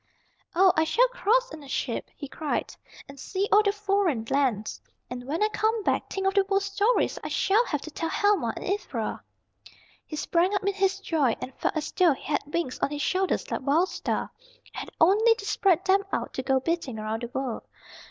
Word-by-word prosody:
"Oh, 370 +1 +6
I 315 - +3
shall 480 +10 +3
cross - - +1
in 310 - -8
a 280 - -12
ship," - - -3
he 285 - -7
cried, 300 +2 -3 0.3
"and 275 -1 -12
see 390 +7 -2
all 415 - +7
the 405 -1 +2
foreign 395 - 0
lands. 245 -7 0 0.3
And 245 0 -6
when 320 +8 0
I - - +4
come 435 0 0
back, - - 0
think 385 -1 -3
of 385 - +2
the 395 0 +4
World 390 0 +1
Stories 405 +4 +1
I - - -3
shall 415 +5 +2
have 295 - -2
to 315 - -8
tell 330 +2 -3
Helma 400 - +2
and - - -7
Ivra!" 400 +2 -3 0.9
He 310 - -6
sprang 345 +6 +1
up 400 - -1
in 400 - +1
his 390 0 +1
joy, 300 -10 +1
and 260 - -7
felt - - 0
as 300 - -3
though 355 -5 +4
he - - -12
had 290 - 0
wings 335 -6 -2
on - - +1
his 295 0 -3
shoulders 380 0 0
like - - -2
Wild 310 +8 +2
Star, - - -3 0.3
and - - -23
had - - -6
only 430 +7 +5
to 405 - -9
spread 385 -3 +2
them 390 +1 +4
out - - -2
to - - -2
go 265 0 +2
beating 290 -5 -2
around 215 +1 -3
the 240 - -3
world. 250 -1 -3
360 Hz, 215 wpm, -26 LUFS, 280-400 Hz, 0.9 s, all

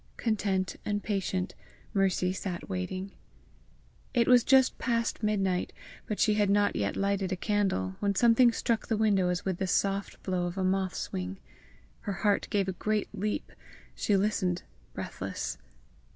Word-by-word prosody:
Content 195 -4 0
and 205 -1 -2
patient, 190 -2 -1 0.4
Mercy 190 -2 +2
sat 185 -2 -5
watching. 185 - -4 1.0
It 235 -2 +4
was 250 -2 +7
just 265 0 +4
past 230 -2 0
midnight, 195 -4 0 0.3
but 210 - -3
she 215 - +4
had 210 -1 +2
not 205 0 +3
yet 100 -1 -1
lighted 200 -1 0
a - - +1
candle, 185 - 0
when 200 -1 0
something 235 +3 +6
struck 230 -1 -1
the 225 - +1
window 200 -4 +3
as 180 0 -2
with 190 -2 -1
the 190 - 0
soft 195 +2 0
blow 180 -2 0
of 175 +2 -6
a 190 - 0
moth's 185 0 -1
wing. 90 +1 -3 0.6
Her 205 - -4
heart 205 +2 +1
gave 200 -2 +1
a - - 0
great 210 +3 -1
leap. 210 +1 -2 0.4
She 205 - +1
listened 190 -3 0 0.3
breathless. - - -4
195 Hz, 155 wpm, -29 LUFS, 185-210 Hz, 1.0 s, was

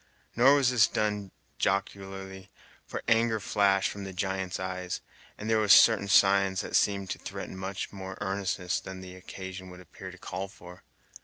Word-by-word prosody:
Nor 130 +4 +6
was 135 -3 +3
this 120 -4 +5
done 105 -2 -1 0.3
jocularly, 95 -1 -3 0.4
for - - -5
anger 115 -1 +3
flashed 100 -1 +2
from 100 - -7
the 95 -1 -7
giant's 95 0 -2
eyes, 90 -1 -4 0.4
and 105 - -6
there 110 0 +3
were 105 - +1
certain 100 0 +7
signs 95 -1 +4
that - - -4
seemed 100 -2 +2
to - - -4
threaten - - -7
much 95 +1 -5
more 95 -1 -7
earnestness 95 -2 -1
than 95 0 -8
the 90 0 -10
occasion 95 0 -8
would 90 0 -11
appear 90 - -10
to - - -12
call 95 +2 -5
for. 90 -2 -13
95 Hz, 170 wpm, -29 LUFS, 95-100 Hz, 0.4 s, certain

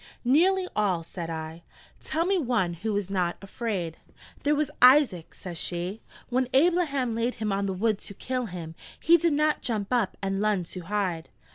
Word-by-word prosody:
'Nearly 365 +8 +4
all,' 190 -5 +1
said 170 0 -6
I: 160 0 -6 0.4
'tell 325 +2 0
me 385 0 +2
one 235 - 0
who 210 +7 -3
was 200 -2 -2
not 180 -3 0
afraid 195 -5 -4 0.2
' - - -21
'There 295 +1 +3
was 300 -1 0
Isaac,' 250 - +5
says 175 -4 -7
she: 180 +5 -3 0.3
'when 255 0 +1
Ablaham 285 -6 +2
laid 230 +2 -1
him 215 -2 -2
on 200 0 0
the 190 - -1
wood 210 +2 0
to 200 - -9
kill 255 +1 -3
him, 170 -4 -7 0.3
he 335 - +6
did 335 -1 +2
not 305 +1 +2
jump 215 -1 -2
up 230 -6 +1
and 195 0 -2
lun 210 -3 +1
to 175 +2 -8
hide.' 180 -3 -2
210 Hz, 185 wpm, -27 LUFS, 180-260 Hz, 0.4 s, he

